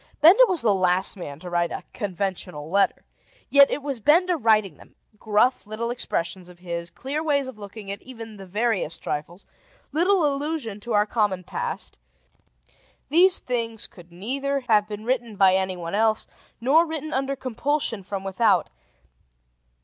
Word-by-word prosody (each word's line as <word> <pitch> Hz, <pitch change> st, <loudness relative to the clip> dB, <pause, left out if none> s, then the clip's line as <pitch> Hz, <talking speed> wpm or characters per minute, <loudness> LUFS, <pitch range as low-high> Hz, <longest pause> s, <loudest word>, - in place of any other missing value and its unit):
Benda 370 Hz, +11 st, +8 dB
was 365 Hz, -, 0 dB
the 215 Hz, -3 st, +4 dB
last 185 Hz, -1 st, +3 dB
man 145 Hz, -6 st, -8 dB
to 180 Hz, -, -9 dB
write 175 Hz, -1 st, +1 dB
a -, -, -5 dB
conventional 185 Hz, -6 st, -4 dB
letter. 200 Hz, +1 st, +2 dB, 0.5 s
Yet, 280 Hz, -1 st, +7 dB
it 290 Hz, -, -3 dB
was 275 Hz, -4 st, -3 dB
Benda 345 Hz, -, +4 dB
writing 215 Hz, -, +2 dB
them: -, -, -18 dB, 0.2 s
gruff 220 Hz, +3 st, +1 dB
little 230 Hz, +2 st, -3 dB
expressions 180 Hz, -6 st, -3 dB
of 180 Hz, -, -15 dB
his, 170 Hz, -1 st, -5 dB
clear 280 Hz, -, -4 dB
ways 285 Hz, -4 st, +1 dB
of 260 Hz, -5 st, -9 dB
looking 205 Hz, 0 st, -8 dB
at 200 Hz, -, -6 dB
even 225 Hz, -4 st, -10 dB
the 195 Hz, -1 st, -10 dB
veriest 205 Hz, -4 st, -1 dB
trifles, 170 Hz, +5 st, -5 dB, 0.5 s
little 350 Hz, +3 st, +3 dB
allusion 285 Hz, -6 st, -2 dB
to 235 Hz, +2 st, -5 dB
our 210 Hz, 0 st, +4 dB
common 205 Hz, -4 st, 0 dB
past: -, -, -5 dB, 1.1 s
these 355 Hz, +5 st, +5 dB
things 230 Hz, -3 st, -2 dB
could 175 Hz, -1 st, -15 dB
neither 270 Hz, +10 st, -2 dB
have 215 Hz, -4 st, +3 dB
been 215 Hz, 0 st, -7 dB
written 240 Hz, -3 st, -1 dB
by 190 Hz, -1 st, +5 dB
anyone 185 Hz, -2 st, -1 dB
else, 220 Hz, +1 st, +2 dB, 0.3 s
nor 275 Hz, +8 st, +4 dB
written 315 Hz, -2 st, -5 dB
under 270 Hz, +1 st, -1 dB
compulsion 260 Hz, -2 st, -2 dB
from 195 Hz, 0 st, -5 dB
without. 195 Hz, +3 st, +2 dB
220 Hz, 155 wpm, -24 LUFS, 190-275 Hz, 1.1 s, Benda